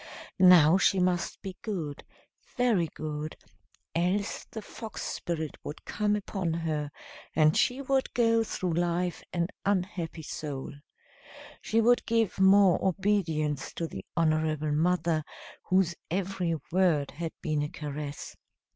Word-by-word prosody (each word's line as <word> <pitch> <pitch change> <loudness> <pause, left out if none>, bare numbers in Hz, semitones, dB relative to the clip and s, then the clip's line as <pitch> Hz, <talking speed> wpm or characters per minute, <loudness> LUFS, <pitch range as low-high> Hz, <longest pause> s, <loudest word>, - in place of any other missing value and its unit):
Now 180 -2 +7
she 195 - +3
must 180 -1 0
be 190 -2 -6
good 165 -10 -4 0.5
very 230 -9 +3
good 155 0 -5 0.6
else 185 +5 0
the 220 - -8
fox 220 +1 -7
spirit 160 -3 -3
would 150 - -8
come 210 0 0
upon 195 -4 -2
her, 155 -3 -2 0.5
and 155 0 +5
she 260 +3 +2
would 270 0 +1
go 230 -1 +4
through 185 -5 -2
life 175 +1 0
an 170 0 0
unhappy 180 -4 -1
soul. 145 -2 -5 0.9
She 225 +1 +2
would 240 +2 +4
give 225 -4 +1
more 195 -1 +6
obedience 165 -7 0
to 170 - -2
the 95 -11 -7
honorable 155 -2 +1
mother, 165 0 +1 0.4
whose 185 -2 +2 0.2
every 180 -1 -1 0.2
word 165 -6 +2
had 160 +3 -5
been 155 -2 0
a 150 - -2
caress. 145 -1 -6
175 Hz, 130 wpm, -29 LUFS, 155-195 Hz, 0.9 s, Now